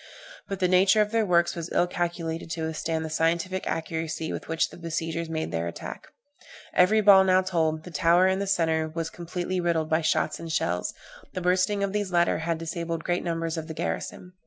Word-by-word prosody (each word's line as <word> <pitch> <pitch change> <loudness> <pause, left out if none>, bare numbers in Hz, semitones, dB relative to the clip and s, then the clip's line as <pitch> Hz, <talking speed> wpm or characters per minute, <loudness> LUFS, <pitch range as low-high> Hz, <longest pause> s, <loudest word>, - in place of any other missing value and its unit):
But 195 - -3
the 185 - +3
nature 190 +4 +5
of 210 0 +2
their 225 -2 +1
works 170 -1 +3
was 170 0 -5
ill 175 - +3
calculated 170 -2 -3
to 165 -2 -3
withstand 160 0 -2
the - - -4
scientific 170 +4 0
accuracy 160 -1 -3
with - - -6
which 160 0 0
the - - -11
besiegers 165 0 -3
made 160 0 -3
their 85 +1 -2
attack. 85 - -7 0.7
Every 215 +5 +5
ball 195 -2 +8
now 185 0 +4
told 160 -4 0
the 180 - -10
tower 170 +3 +4
in 190 0 +2
the 200 - -2
centre 160 -4 +1
was 165 +1 -4
completely 180 +1 -3
riddled 165 -3 0
by 160 +1 +3
shots 155 -1 0
and 165 -1 -6
shells; 90 - -1 0.4
the 185 - -3
bursting 185 +3 +2
of 200 0 -1
these 205 -2 -1
latter 175 -2 +2
had 165 0 -1
disabled 165 0 -4
great 175 0 -1
numbers 165 -1 -2
of 160 -1 -4
the 160 - -7
garrison. 85 - -4
170 Hz, 205 wpm, -26 LUFS, 160-185 Hz, 0.7 s, ball